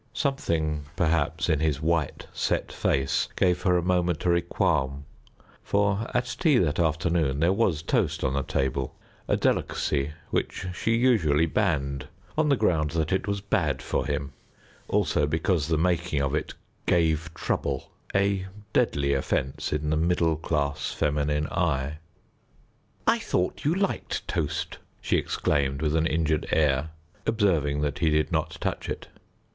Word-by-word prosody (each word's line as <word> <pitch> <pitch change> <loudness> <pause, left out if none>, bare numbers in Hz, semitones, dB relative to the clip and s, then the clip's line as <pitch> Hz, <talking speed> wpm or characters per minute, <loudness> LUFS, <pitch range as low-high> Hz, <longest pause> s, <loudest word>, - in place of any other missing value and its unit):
Something 80 - -1
perhaps 80 -2 +1
in 80 -4 +2
his 75 -2 +1
white 80 -1 0
set - - -1
face 70 0 +1
gave 90 -1 +2
her 90 -2 +3
a 85 - 0
momentary 90 -1 +2
qualm, 70 -4 0 0.6
for 100 +2 +1
at 125 0 -1
tea 155 -7 +4
that 85 -6 +1
afternoon 80 -3 +1
there 85 +4 +3
was 95 -7 +1
toast - - 0
on 65 - +1
the 70 - +1
table, 65 0 -1 0.3
a - - +2
delicacy 70 0 0 0.2
which - - -1
she 115 +5 +1
usually 100 - +3
banned 70 -7 0 0.3
on 155 -1 +2
the 140 - +5
ground 85 - +2
that 80 -1 0
it 95 - 0
was 100 0 -1
bad 80 -9 0
for 65 - -2
him; 70 0 -2 0.5
also 75 - +1
because 80 0 +1
the 80 -1 +1
making 85 -2 +1
of 70 0 0
it 75 - -2 0.3
"gave 80 -2 +2
trouble," - - -2 0.2
a 100 -1 +2 0.3
deadly 70 -1 +2
offence 65 0 -1
in 75 0 -1
the 80 - +2
middle 85 0 +2
class 75 -2 -1
feminine 75 0 0
eye. 75 -4 -1 1.1
"I - - +4
thought 90 +8 -1
you 155 +4 +3
liked 195 0 -2
toast," - - -2 0.2
she - - +1
exclaimed, 70 -2 0
with 75 0 +1
an 80 0 +3
injured 80 -1 0
air, 75 -1 +2 0.4
observing 80 -10 +2
that 75 +4 -1
he 85 -2 +3
did 75 0 +1
not - - -1
touch - - -3
it. - - -5
80 Hz, 150 wpm, -26 LUFS, 75-90 Hz, 1.1 s, the